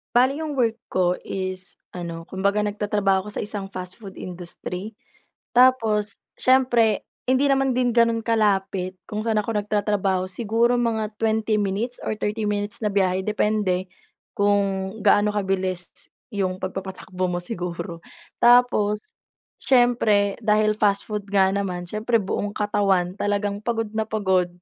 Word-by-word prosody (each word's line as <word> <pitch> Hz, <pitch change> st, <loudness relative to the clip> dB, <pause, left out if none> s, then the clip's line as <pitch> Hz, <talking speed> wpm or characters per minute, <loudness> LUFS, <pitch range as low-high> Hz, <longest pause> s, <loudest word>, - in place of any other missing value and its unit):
Bale 255 Hz, +2 st, +5 dB
yung 305 Hz, -3 st, -3 dB
work 230 Hz, -3 st, +1 dB
ko 180 Hz, -1 st, +1 dB
is, 185 Hz, -1 st, -4 dB, 0.2 s
ano 170 Hz, -2 st, -6 dB
kumbaga 200 Hz, +3 st, 0 dB
nagtatrabaho 205 Hz, -1 st, 0 dB
ako -, -, -5 dB
sa -, -, -2 dB
isang 205 Hz, -2 st, -4 dB
fast 185 Hz, +1 st, -8 dB
food 195 Hz, -3 st, -10 dB
industry. 180 Hz, +3 st, -6 dB, 0.6 s
Tapos 220 Hz, -5 st, +4 dB, 0.2 s
syempre 245 Hz, -4 st, +3 dB, 0.2 s
hindi 260 Hz, +2 st, +3 dB
naman 270 Hz, -2 st, +2 dB
din 250 Hz, -1 st, +2 dB
ganun 230 Hz, -1 st, +3 dB
kalapit 195 Hz, -4 st, +1 dB
kung 215 Hz, 0 st, -3 dB
saan 215 Hz, -1 st, +2 dB
ako 215 Hz, -1 st, -1 dB
nagtatrabaho, 205 Hz, -2 st, 0 dB
siguro 235 Hz, +4 st, +1 dB
mga 220 Hz, -2 st, 0 dB
20 220 Hz, -1 st, +1 dB
minutes 205 Hz, +5 st, -1 dB
or 215 Hz, -, -2 dB
30 210 Hz, 0 st, -2 dB
minutes 205 Hz, +2 st, 0 dB
na 210 Hz, -, +2 dB
biyahe, 190 Hz, -1 st, +1 dB
depende 210 Hz, -3 st, 0 dB, 0.5 s
kung 200 Hz, -1 st, +1 dB
gaano 210 Hz, 0 st, +4 dB
kabilis 190 Hz, -3 st, -1 dB, 0.4 s
'yung 185 Hz, -2 st, -1 dB
pagpapatakbo 185 Hz, -1 st, -4 dB
mo 175 Hz, 0 st, -2 dB
siguro. 175 Hz, -3 st, -5 dB, 0.4 s
Tapos, 235 Hz, -4 st, +4 dB, 0.6 s
siyempre 230 Hz, -6 st, +3 dB
dahil 215 Hz, 0 st, +3 dB
fast 200 Hz, -1 st, +2 dB
food 210 Hz, -2 st, -4 dB
nga 190 Hz, -1 st, +4 dB
naman, 180 Hz, -3 st, -3 dB
siyempre 225 Hz, +2 st, +1 dB
buong 205 Hz, +2 st, -2 dB
katawan 195 Hz, -3 st, +1 dB
talagang 205 Hz, 0 st, -1 dB
pagod 225 Hz, -2 st, -1 dB
na 220 Hz, 0 st, 0 dB
pagod. 190 Hz, -5 st, +1 dB
205 Hz, 135 wpm, -23 LUFS, 190-220 Hz, 0.6 s, Bale